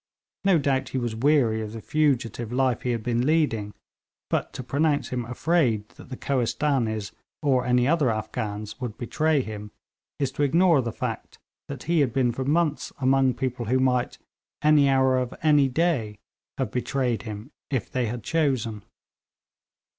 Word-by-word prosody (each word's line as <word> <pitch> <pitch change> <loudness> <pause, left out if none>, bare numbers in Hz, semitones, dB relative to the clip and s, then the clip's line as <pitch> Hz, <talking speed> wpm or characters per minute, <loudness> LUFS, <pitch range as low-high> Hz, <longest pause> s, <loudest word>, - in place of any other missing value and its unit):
No 195 -3 +4
doubt 140 -3 0
he - - -3
was 120 -3 -2
weary 120 -3 +2
of 110 0 -6
the 115 - -6
fugitive 125 -7 0
life 130 -1 +1
he 125 - -2
had 115 -2 -1
been 120 0 0
leading, 135 -9 +1 0.6
but - - 0
to 130 - -6
pronounce 145 +3 0
him 125 -2 -3
afraid 125 -5 +1
that - - -15
the 130 - -6
Kohistanees 120 -5 0 0.3
or 130 -3 +2
any 125 0 +3
other 150 -4 +3
Afghans 110 0 -4
would 120 -4 -4
betray 155 +4 +1
him 105 -2 -7 0.5
is 140 -2 -1
to - - -4
ignore 165 +1 +4
the 115 -2 -3
fact - - -5 0.3
that 140 -2 -7
he 170 +1 +1
had 130 -5 +2
been 125 -3 +2
for 130 +3 -3
months 150 +2 0
among 135 -1 +3
people 125 -2 -3
who 130 +3 +2
might, 125 -1 +1 0.5
any 150 -2 +5
hour 130 -1 +3
of 125 -1 -3
any 150 -3 +5
day, 130 -8 0 0.4
have - - -2
betrayed 125 -2 -1
him 110 +4 -8 0.2
if 130 -7 -2
they 125 -2 0
had 120 +1 -5
chosen. 130 -9 0
130 Hz, 165 wpm, -25 LUFS, 115-145 Hz, 0.6 s, any